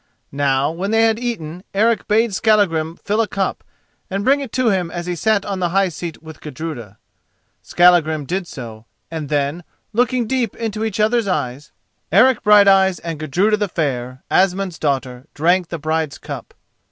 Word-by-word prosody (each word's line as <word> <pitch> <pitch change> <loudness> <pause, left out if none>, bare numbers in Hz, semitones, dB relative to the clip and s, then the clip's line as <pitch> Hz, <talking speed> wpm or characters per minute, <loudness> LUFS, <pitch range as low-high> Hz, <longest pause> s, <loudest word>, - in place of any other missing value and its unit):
Now, 140 0 +1
when 180 +5 -4
they 225 +1 +3
had 225 0 +2
eaten, 180 -8 -5
Eric 225 +3 +2
bade 220 0 +2
Skallagrim 185 -7 +2
fill 210 +5 -1
a 225 - 0
cup, 195 -1 -2 0.5
and 195 +2 -3
bring 275 +2 +4
it 275 -5 -6
to 255 -2 +2
him 185 -4 0
as 175 +1 -5
he 180 0 -2
sat 205 +3 +1
on 195 -2 -3
the 175 -1 0
high 195 +1 +2
seat 170 0 -7
with 160 -1 -12
Gudruda. 130 -8 -7 0.6
Skallagrim 165 -4 +3
did 180 +4 -3
so; 115 -7 -9 0.3
and 155 -3 -5
then, 145 +3 -1 0.3
looking 245 +1 +1
deep 240 -2 -1
into 220 -1 -3
each 220 -2 -3
other's 220 +1 +2
eyes, 140 -5 -3 0.4
Eric 230 +7 +5
Brighteyes 195 -3 +5
and 165 -3 -5
Gudruda 185 +8 +1
the 205 -2 -1
Fair, 130 -6 -3
Asmund's 185 -2 +1
daughter, 130 -3 -2
drank 175 +3 +2
the 170 - -5
bride's 155 -1 -2
cup. - - -8
180 Hz, 170 wpm, -19 LUFS, 155-210 Hz, 0.6 s, Eric